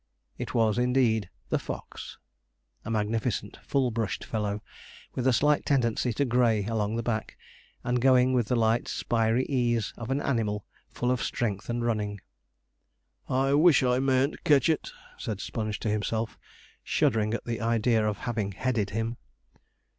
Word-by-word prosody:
It - - -5
was, 115 -1 +3
indeed, 120 -5 +2 0.2
the - - +1
fox! - - -7 0.7
a - - -6
magnificent 110 -1 -1
full 135 -3 0
brushed 110 -2 -2
fellow, 105 -2 -2 0.5
with 130 0 -1
a - - +6
slight 150 +4 +3
tendency 125 -3 +1
to 140 - +1
grey 120 -4 +2
along 110 -1 -1
the 115 - -2
back, 110 -2 -3 0.5
and 125 0 0
going 130 0 +5
with 120 -4 +2
the 125 - +1
light 115 0 +2
spiry 115 +1 +1
ease 120 -5 0
of 120 -1 -6
an 135 +1 +1
animal 105 -7 -1 0.2
full 125 +1 -1
of 125 - 0
strength 105 -3 -2
and 120 0 -1
running. 105 -3 -1 1.1
'I 135 +2 +2
wish 150 -1 +6
I 125 0 +2
mayn't 135 +1 +1
ketch 145 -1 +4
it,' 160 - 0 0.3
said 105 -4 -4
Sponge 110 -2 -3
to 110 - -1
himself, 110 +2 -2 0.4
shuddering 110 0 +1
at - - -6
the 115 -2 -3
idea 115 0 +2
of 105 -2 0
having 110 -5 -2
headed 110 -1 -1
him. 115 +3 -2
115 Hz, 155 wpm, -28 LUFS, 110-125 Hz, 1.1 s, a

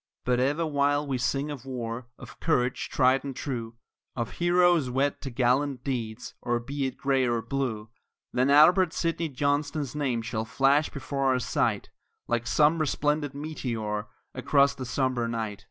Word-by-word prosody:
But 125 0 +2
ever 145 +6 +1
while 145 -1 +1
we 135 -3 -2
sing 135 +4 -1
of 140 -4 -7
war, 125 -2 -5
of - - -12
courage 125 -6 0
tried 130 0 +3
and 140 -2 -5
true, 120 -5 -4 0.4
Of 120 -2 -3
heroes 175 -5 +4
wed 135 +3 0
to 135 - -5
gallant 130 +2 +1
deeds, 120 -4 -4
or 120 0 0
be 135 +3 -3
it 130 - -7
Gray 135 -2 +1
or 120 -1 +1
Blue, 115 -4 -3 0.4
Then 125 +2 +2
Albert 165 +4 +6
Sidney 165 -1 -1
Johnston's 145 0 -1
name 130 -6 -1
shall 110 0 -2
flash 135 +6 +2
before 140 -1 -3
our 130 -1 +3
sight 125 - -1 0.4
Like 120 0 -1
some 150 +6 +3
resplendent 150 -1 0
meteor 115 -8 -4 0.3
across 140 +2 +3
the 130 - -7
sombre 130 -3 0
night. 110 -3 -3
135 Hz, 160 wpm, -27 LUFS, 120-145 Hz, 0.4 s, Albert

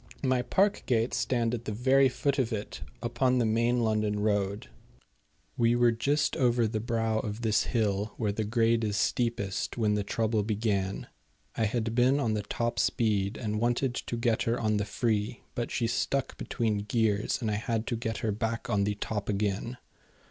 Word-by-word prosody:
My 130 -2 +2
park 195 +10 +2
gates 115 -1 +1
stand 120 -2 0
at 120 -1 -4
the - - -3
very 130 +5 +4
foot 140 +2 -1
of 125 -2 +1
it 105 -2 -5 0.2
upon 130 -1 +1
the 120 - +2
main 115 +2 +2
London 110 -2 +1
road. 105 - 0 0.9
We 120 0 +3
were 120 -1 +4
just 140 +6 +1
over 120 -2 +3
the 110 0 -1
brow 115 -1 0
of 110 +1 -4
this 110 -2 +2
hill, 105 -3 -1
where 105 -3 0
the 110 +2 -2
grade 115 +1 +2
is 105 -2 -1
steepest, 110 -3 -1
when 110 -3 +2
the 105 -1 0
trouble 110 +1 0
began. 100 -2 -1 0.5
I 110 - +1
had 115 +1 -1
been 130 +4 +3
on 115 -6 0
the 105 - 0
top 120 +3 -2
speed, 105 -4 +1
and 105 -2 -2
wanted 120 +2 +1
to 120 - -4
get 115 -1 +1
her 115 +1 0
on 110 -2 +1
the 105 - -1
free; 110 0 -1
but 120 - -3
she 120 - -1
stuck 130 +3 -1
between 110 -3 -1
gears, 105 0 0
and 110 -4 -1
I 105 - 0
had 115 +1 -2
to 120 - -2
get 115 -1 -3
her 110 - +1
back 115 +3 -3
on 100 -2 +2
the 105 0 -1
top 105 0 -4
again. 105 +4 -1
115 Hz, 190 wpm, -29 LUFS, 105-120 Hz, 0.9 s, very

